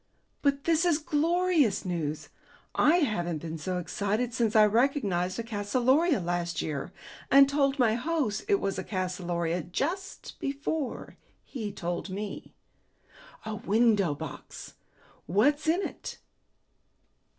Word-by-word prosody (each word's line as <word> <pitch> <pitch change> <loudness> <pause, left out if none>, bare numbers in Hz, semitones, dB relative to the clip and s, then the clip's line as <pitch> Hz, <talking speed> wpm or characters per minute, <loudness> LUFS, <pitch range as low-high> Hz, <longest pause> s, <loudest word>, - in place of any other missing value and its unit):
"But 280 -1 +1
this 330 0 +2
is 345 -4 +3
glorious 315 - +1
news! 160 -4 -3 0.4
I 345 +4 +4
haven't 175 - 0
been 160 +1 -6
so 180 +3 -2
excited 205 +7 -1
since 230 -2 0
I 215 -1 +8
recognized 210 -6 +1
a 230 - -2
calceolaria 245 - +2
last 175 -1 -2
year, 150 +2 -3 0.4
and 275 0 +8
told 280 0 +1
my 240 -5 +3
host 250 -4 -1
it 400 -2 +3
was 195 - -2
a - - -3
calceolaria 180 -3 -2
just 335 - -4
before 280 0 -3 0.3
he 220 -7 -5
told 175 0 -4
me. 200 +2 -6 0.9
A 220 - -3
window 210 -5 +2
box! - - -9 0.5
What's 290 - +2
in 345 +5 +2
it?" - - -6
220 Hz, 125 wpm, -28 LUFS, 180-285 Hz, 0.9 s, I